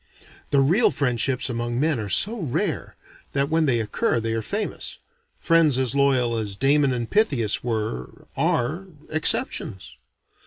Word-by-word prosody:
The 140 Hz, -1 st, +3 dB
real 175 Hz, -, +3 dB
friendships 125 Hz, -1 st, -1 dB
among 120 Hz, -1 st, -3 dB
men 150 Hz, -3 st, +1 dB
are 105 Hz, -2 st, -5 dB
so 215 Hz, -, +4 dB
rare 150 Hz, -9 st, -3 dB, 0.4 s
than 140 Hz, +1 st, 0 dB
when 160 Hz, -1 st, +2 dB
they 120 Hz, -3 st, +2 dB
occur 110 Hz, +2 st, -1 dB
they 115 Hz, 0 st, -2 dB
are 115 Hz, -, -1 dB
famous. 205 Hz, -, -4 dB, 0.4 s
Friends 165 Hz, -5 st, +3 dB
as 130 Hz, -3 st, +1 dB
loyal 130 Hz, -4 st, +2 dB
as 105 Hz, -3 st, -3 dB
Damon 140 Hz, +4 st, +2 dB
and 120 Hz, -2 st, -3 dB
Pythias 140 Hz, -, +1 dB
were, 110 Hz, -, -4 dB
are 155 Hz, +11 st, -1 dB, 0.2 s
exceptions. 155 Hz, -10 st, +1 dB
130 Hz, 145 wpm, -23 LUFS, 115-155 Hz, 0.4 s, so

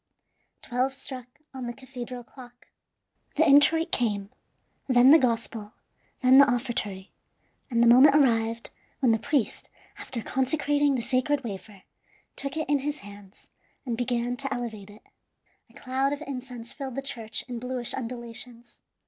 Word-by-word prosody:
Twelve 255 Hz, +2 st, -1 dB
struck 260 Hz, -2 st, -7 dB, 0.3 s
on 260 Hz, -2 st, -5 dB
the 240 Hz, -, -4 dB
cathedral 250 Hz, -1 st, -8 dB
clock. 245 Hz, -1 st, -15 dB, 0.7 s
The 320 Hz, +1 st, +4 dB
introit 290 Hz, +3 st, +5 dB
came, 205 Hz, -4 st, -1 dB, 0.6 s
then 255 Hz, 0 st, +6 dB
the 320 Hz, -, +9 dB
Gospel, 230 Hz, -4 st, -1 dB, 0.5 s
then 260 Hz, +2 st, +7 dB
the 280 Hz, -1 st, +7 dB
offertory, 230 Hz, -6 st, -3 dB, 0.6 s
and 235 Hz, -2 st, +2 dB
the -, -, +5 dB
moment 260 Hz, +5 st, +8 dB
arrived 230 Hz, -5 st, +2 dB, 0.3 s
when 255 Hz, -4 st, +3 dB
the 225 Hz, -, +2 dB
priest, 285 Hz, -2 st, -1 dB, 0.3 s
after 235 Hz, -4 st, -6 dB
consecrating 285 Hz, +1 st, +1 dB
the 240 Hz, -, -2 dB
sacred 265 Hz, +3 st, 0 dB
wafer, 200 Hz, -2 st, -8 dB, 0.5 s
took 275 Hz, +2 st, -4 dB
it 315 Hz, -, -2 dB
in 290 Hz, -1 st, +2 dB
his 295 Hz, +2 st, -3 dB
hands 205 Hz, -1 st, -14 dB, 0.4 s
and 240 Hz, -3 st, -2 dB
began 245 Hz, 0 st, -1 dB
to 275 Hz, +1 st, -3 dB
elevate 220 Hz, -5 st, -5 dB
it. 205 Hz, +1 st, -15 dB, 0.7 s
A -, -, -22 dB
cloud 265 Hz, +2 st, -1 dB
of 290 Hz, +1 st, -5 dB
incense 250 Hz, -4 st, -7 dB
filled 270 Hz, -4 st, -6 dB
the 275 Hz, -, -3 dB
church 230 Hz, -5 st, -4 dB
in 245 Hz, -2 st, -5 dB
bluish 250 Hz, -1 st, -3 dB
undulations. 240 Hz, -1 st, -7 dB
250 Hz, 150 wpm, -27 LUFS, 230-270 Hz, 0.7 s, the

